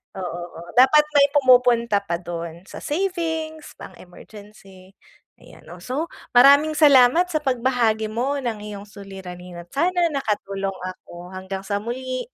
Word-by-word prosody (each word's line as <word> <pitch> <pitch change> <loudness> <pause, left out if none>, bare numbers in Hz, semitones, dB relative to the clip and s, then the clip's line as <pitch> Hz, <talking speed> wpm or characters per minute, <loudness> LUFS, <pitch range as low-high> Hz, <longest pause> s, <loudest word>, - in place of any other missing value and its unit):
Oo, 175 -2 -5
oo. 170 +1 -11
Dapat 295 +4 +6
may 285 -1 +5
pumupunta 245 -5 +4
pa 185 -4 -4
dun, 170 0 -7
sa - - -11
savings, 320 -2 -3
pang-emergency. 195 0 -15 0.4
Ayan, - - -18
oh, - - -12
so 290 +6 -3 0.2
maraming 280 +5 +6
salamat 300 +2 +5
sa 310 -4 -3
pagbahagi 240 -4 0
mo 255 +6 -2
ng 240 -4 -3
iyong 205 -1 -8
suliranin 185 -3 -10
at 175 - -12
sana 350 +2 +2
nakatulong 205 -8 -3
ako. 180 -1 -9
Hanggang 190 +1 -6
sa 205 0 -2
muli. 255 +2 -4
235 Hz, 135 wpm, -22 LUFS, 195-285 Hz, 0.4 s, Dapat